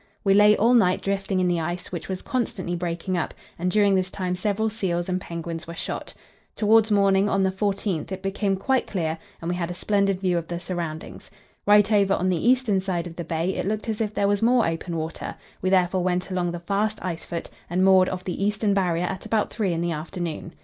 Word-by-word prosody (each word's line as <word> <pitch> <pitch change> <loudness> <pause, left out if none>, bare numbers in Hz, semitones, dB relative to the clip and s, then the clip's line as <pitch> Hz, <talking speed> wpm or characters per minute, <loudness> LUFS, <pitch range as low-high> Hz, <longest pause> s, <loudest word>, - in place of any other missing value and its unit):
We 195 - +4
lay 210 +1 +6
all 235 +4 +4
night 185 -7 +4
drifting 195 -1 -1
in 180 - +2
the 175 -1 +1
ice, 175 +2 -4
which 175 -1 -6
was 185 -1 -4
constantly 195 -8 -2
breaking 175 +1 -2
up, - - -3 0.2
and 180 +1 0
during 205 0 +3
this 185 -1 +1
time 185 -1 -2
several 210 +3 0
seals 185 -6 -2
and 185 0 -1
penguins 170 -1 -6
were 170 - -7
shot. - - -5 0.4
Towards 220 +1 +4
morning 200 -1 +3
on 195 -1 +2
the 190 - +2
14th 195 -4 -2
it 190 0 -5
became 195 0 0
quite 260 +7 +1
clear, 160 -4 -2 0.2
and - - -3
we - - +1
had 175 -1 -2
a 180 - -5
splendid 195 0 +1
view 180 -2 +1
of 165 - -9
the 170 0 -4
surroundings. 170 -3 -5 0.4
Right 210 0 +6
over 200 -2 +4
on 185 +2 0
the 185 +6 +2
eastern 245 -6 +3
side 185 -3 -2
of 170 -1 -8
the 170 - -4
bay 165 +3 -1
it - - -2
looked 215 +2 -2
as 220 0 -2
if 215 -2 0
there 200 -1 +1
was 205 0 +1
more 240 +1 +4
open 165 +1 -3
water; 160 +1 -5 0.3
we 185 - +1
therefore 185 -1 +3
went 180 +1 -1
along 180 -1 0
the 175 - -5
fast 205 +4 0
ice 170 -3 -4
foot 170 -1 -5 0.2
and 180 +2 +2
moored 190 -1 +6
off 185 0 -4
the 185 +1 -3
eastern 205 0 +1
Barrier 180 -3 +1
at 190 +1 -4
about 215 -2 0
three 205 -5 0
in 165 -1 -1
the 170 0 0
afternoon. 165 +1 -5
185 Hz, 230 wpm, -24 LUFS, 175-205 Hz, 0.4 s, lay